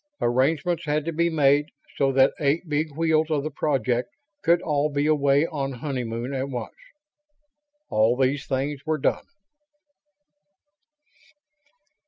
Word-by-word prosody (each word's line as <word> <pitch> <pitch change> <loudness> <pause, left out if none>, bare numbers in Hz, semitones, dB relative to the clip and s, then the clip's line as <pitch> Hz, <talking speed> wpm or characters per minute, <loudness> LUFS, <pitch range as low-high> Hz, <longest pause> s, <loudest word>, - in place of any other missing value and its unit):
Arrangements 155 +7 +1
had 150 0 0
to 165 - -3
be 170 +2 +1
made 145 -2 +3 0.3
so 135 -1 +2
that 135 0 +4
eight 155 +4 0
Big 155 +1 -1
Wheels 160 -1 +2
of 150 -3 0
the 155 - -4
Project 130 - 0 0.3
could 170 -1 +3
all 150 -1 +1
be 145 0 0
away 145 -1 +3
on 140 -4 -3
honeymoon 125 -1 -4
at 135 +1 -2
once. 125 -2 -5 1.2
All 110 +3 +2
these 135 +2 0
things 135 +1 -2
were 155 -1 -1
done. 140 - 0
145 Hz, 130 wpm, -24 LUFS, 135-155 Hz, 1.2 s, that